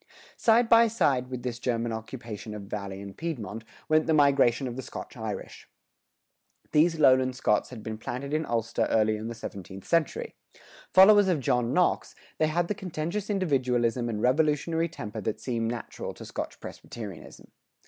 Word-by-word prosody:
Side 230 +1 +4
by 230 0 +7
side 145 - +1
with 125 -2 -5
this 120 -2 -4
German 120 -2 -1
occupation 110 -2 -7
of 105 - -7
Valley 100 -1 -6
and 100 -1 -9
Piedmont, 115 - -5 0.2
went 155 0 +3
the 160 - +3
migration 140 -3 +4
of 120 - -5
the 130 - -4
Scotch - - -8
Irish.[103:1] - - -11
These 160 +2 +3
lowland 130 -3 +5
Scots 105 -4 +1
had 115 -4 -9
been 110 -1 -5
planted 135 +5 -5
in 155 +1 +1
Ulster 115 -4 -1
early 110 -1 +3
in 110 +1 -5
the 115 - -5
seventeenth 95 -3 -8
century. 165 -3 0 0.6
Followers 205 +1 +7
of 175 -5 +2
John 125 -2 +1
Knox, 180 +4 +1 0.2
they 155 - +3
had 170 +2 0
the 210 - 0
contentious 185 0 -4
individualism 125 - +1
and 105 -2 -3
revolutionary 155 +5 +2
temper 110 -8 -6
that 110 +2 -3
seem 115 -1 -2
natural 120 0 -6
to - - -10
Scotch - - -6
Presbyterianism. 105 -8 -9
125 Hz, 165 wpm, -28 LUFS, 115-160 Hz, 0.6 s, by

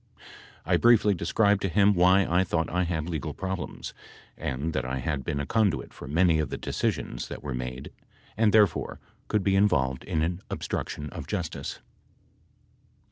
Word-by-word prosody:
"I 85 +2 +3
briefly 110 -1 +5
described 100 +4 +2
to 95 - 0
him 100 +3 +4
why 95 +2 +5
I 90 +3 +2
thought 80 -3 -1
I 90 +1 +1
had 80 -2 -2
legal 80 -6 -4
problems, 95 -4 -5 0.4
and 75 +6 -3
that 70 - -1
I 65 +1 -3
had 70 +2 -2
been 70 - -2
a 70 - -2
conduit 100 - 0
for - - -10
many 80 +2 +3
of 75 - -1
the - - -4
decisions - - -2
that - - -8
were 70 -3 -4
made 65 +1 -5 0.4
and, 110 0 +3
therefore, 105 -5 +3 0.3
could 105 -2 +1
be 95 0 +2
involved 65 -10 +2
in 80 - 0
an 85 +3 -2
obstruction 75 0 -4
of - - -7
justice." - - -4
85 Hz, 170 wpm, -27 LUFS, 70-100 Hz, 0.4 s, briefly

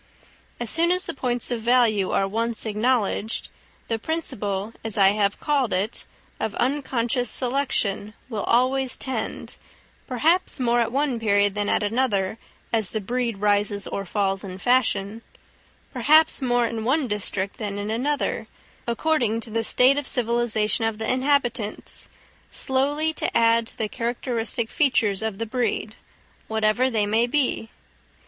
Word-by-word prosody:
As 240 - -2
soon 340 +1 +4
as 365 +1 +1
the - - -4
points 245 -2 -2
of 235 -2 -2
value 230 -5 +3
are 195 - +1
once 230 +3 -1
acknowledged, 220 0 0 0.4
the 225 -1 -2
principle, 215 -9 -3
as 220 -2 -4
I 195 -1 +6
have 200 0 0
called 280 -6 0
it, 195 +5 -1 0.3
of 220 - -2
unconscious 245 -2 0
selection 240 -6 +1
will 220 -5 -4
always 260 +1 +2
tend—perhaps 265 +6 -2
more 240 -1 +2
at 230 -1 0
one 270 -2 0
period 205 -2 +2
than 205 0 -2
at - - +1
another, 210 -2 0 0.3
as 220 -3 +2
the 220 - -3
breed 235 +1 -2
rises 205 0 +1
or 200 - -4
falls 195 0 -1
in 185 -2 -7
fashion—perhaps 245 +6 0
more 245 -2 +2
in 225 -1 -3
one 270 +4 +1
district 200 -2 -2
than 205 -4 -4
in 205 +1 -3
another, 280 +6 -1 0.4
according 235 -2 0
to 225 - -7
the 225 +1 -1
state 260 +5 +4
of 285 - -7
civilisation 235 -2 +1
of 225 -1 -1
the 220 +3 0
inhabitants—slowly 270 +3 -2
to - - -1
add 230 0 +3
to - - -4
the 220 - -1
characteristic 235 -1 -2
features 230 - +1
of 220 -3 -3
the 230 - -3
breed, 225 -2 -2 0.5
whatever 220 +3 +1
they 220 -4 +1
may 220 +3 +2
be. 255 -4 0
230 Hz, 140 wpm, -24 LUFS, 210-255 Hz, 0.5 s, I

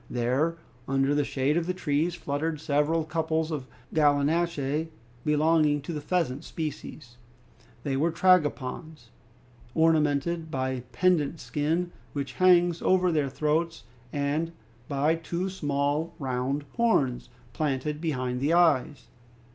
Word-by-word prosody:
There 130 +8 0 0.3
under 135 +1 +2
the 145 0 +2
shade 140 +2 0
of 170 0 -1
the 185 - -1
trees 165 0 0
fluttered 155 -1 -2
several 150 +2 +1
couples 160 0 -1
of 140 -4 -4 0.3
gallinaceae 150 0 +1 0.4
belonging 150 0 +3
to 165 - -5
the 150 - -4
pheasant 150 -6 -1
species. 145 -5 -6 0.7
They 140 -3 -1
were 160 +5 +1
tragopans, 155 -6 +1 0.6
ornamented 160 0 +2
by 130 -2 -1
a 130 -1 -3
pendant 160 +3 +1
skin 165 +4 -1 0.2
which 140 -3 -4
hangs 175 -2 +5
over 185 -1 +3
their 150 -4 +1
throats, 155 0 -1 0.3
and 150 +4 -1 0.3
by 145 +3 +2
two 170 +3 -3
small, 145 0 -1
round 135 0 -2
horns, 135 - +1 0.2
planted 150 +1 -2
behind 130 -6 -2
the 150 +4 +2
eyes. 160 -5 +3
150 Hz, 125 wpm, -27 LUFS, 140-165 Hz, 0.7 s, hangs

